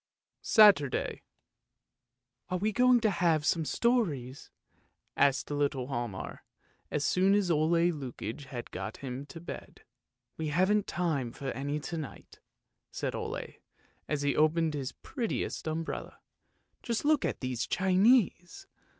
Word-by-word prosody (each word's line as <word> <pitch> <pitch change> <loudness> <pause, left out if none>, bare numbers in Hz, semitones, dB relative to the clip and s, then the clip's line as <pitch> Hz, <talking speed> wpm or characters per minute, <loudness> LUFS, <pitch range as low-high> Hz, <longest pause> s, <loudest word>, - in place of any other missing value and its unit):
SATURDAY 200 - +4 0.6
" 120 - -55
Are 185 - 0
we 210 +4 0
going 250 +2 +4
to 220 -2 +3
have 165 -4 +2
some 160 0 +1
stories? 150 - 0 0.3
" - - -40 0.3
asked 140 +1 +2
little 140 -3 -1
Hialmar, 120 -7 -4 0.5
as 145 -1 -1
soon 190 +5 +3
as 195 -4 +2
Ole 155 0 +2 0.2
Lukoie 135 -2 -6
had 120 -3 -7
got 110 - -5
him 130 +2 -5
to 165 - -9
bed. 170 - -9 0.3
" - - -55
We 160 - -1
haven't 185 +7 +2
time 155 -9 -1
for 135 +2 -5
any 145 +4 -3
to 165 +3 -5
night," 155 -3 -9 0.5
said - - -3
Ole, - - -5 0.5
as 150 -2 -1
he 145 -1 +1
opened 155 +1 +2
his 140 -3 -3
prettiest 235 - -4
umbrella. 160 +1 -4 0.3
" - - -46
Just 235 +2 -2
look 300 -1 +3
at - - -2
these 125 -2 -2
Chinese! 190 - +2
155 Hz, 140 wpm, -30 LUFS, 135-190 Hz, 0.6 s, SATURDAY